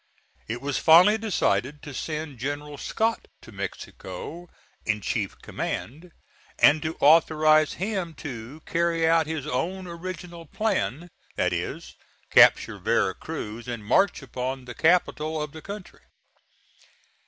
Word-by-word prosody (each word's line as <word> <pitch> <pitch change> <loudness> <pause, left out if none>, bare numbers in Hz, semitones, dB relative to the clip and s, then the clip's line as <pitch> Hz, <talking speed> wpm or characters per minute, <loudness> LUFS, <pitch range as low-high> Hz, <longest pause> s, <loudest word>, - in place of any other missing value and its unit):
It 120 +2 -4
was 145 0 -1
finally 180 +7 +7
decided 150 - 0
to 145 - -8
send 155 -2 -5
General 145 +2 -4
Scott 225 +1 -1 0.2
to - - -13
Mexico 100 - -7 0.3
in 105 -1 0
chief - - -3
command, 160 +8 -5 0.5
and 155 +1 +5
to 155 +1 -3
authorize 155 0 +5
him 190 -4 -3
to 130 +1 -8
carry 165 -1 +1
out 165 -1 +3
his 160 -3 -3
own 180 +9 -2
original 170 -1 -7
plan: 175 - -2 0.2
that - - +1
is, - - -4 0.4
capture - - +6
Vera - - +1
Cruz 110 +3 -7
and 120 -4 -5
march 185 - +2
upon 130 0 -4
the 125 - -7
capital 160 0 +2
of 150 -1 -4
the 160 +1 -10
country. 200 +1 -9
155 Hz, 130 wpm, -26 LUFS, 135-170 Hz, 0.5 s, finally